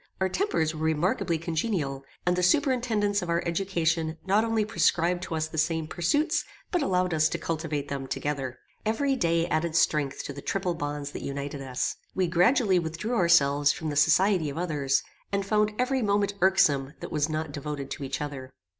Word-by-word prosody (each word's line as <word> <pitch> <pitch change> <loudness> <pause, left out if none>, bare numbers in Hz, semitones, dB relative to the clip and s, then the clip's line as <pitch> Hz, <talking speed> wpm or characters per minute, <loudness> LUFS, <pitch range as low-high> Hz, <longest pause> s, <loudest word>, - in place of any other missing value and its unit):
Our 190 0 +1
tempers 185 - 0
were 155 - -7
remarkably 160 +2 +1
congenial, 160 -4 -2 0.2
and 180 0 +3
the 180 - 0
superintendants 220 - +2
of 180 - -5
our 170 0 +1
education 165 -3 0
not 200 +3 +3
only 225 -2 +1
prescribed 175 -4 +1
to 165 - -4
us 155 0 -1
the 160 0 -4
same 160 0 +1
pursuits, 290 - +1 0.3
but 355 - +1
allowed 180 - +1
us 155 0 +3
to - - -2
cultivate 155 -3 -3
them 135 -1 -4
together. 135 -3 -3 0.3
Every 270 +6 +1
day 170 -6 +1
added 160 0 -1
strength 145 -4 +1
to 140 - -6
the 140 - -8
triple 185 +1 -1
bonds 145 -2 -4
that - - -6
united 140 0 -4
us. 130 -2 -2 0.2
We 185 - +2
gradually 185 +3 +3
withdrew 170 +8 -3
ourselves 145 -7 +4
from 160 - -4
the - - -4
society 160 +3 +4
of 140 - -6
others, 145 -6 0 0.3
and 200 -1 0
found 210 +1 +2
every 260 +1 +1
moment 205 -1 +1
irksome 150 -7 +3
that - - -7
was 150 0 0
not 155 -1 -3
devoted 145 -1 -5
to - - -5
each 135 +1 -3
other. 135 -3 -6
165 Hz, 185 wpm, -27 LUFS, 145-195 Hz, 0.3 s, ourselves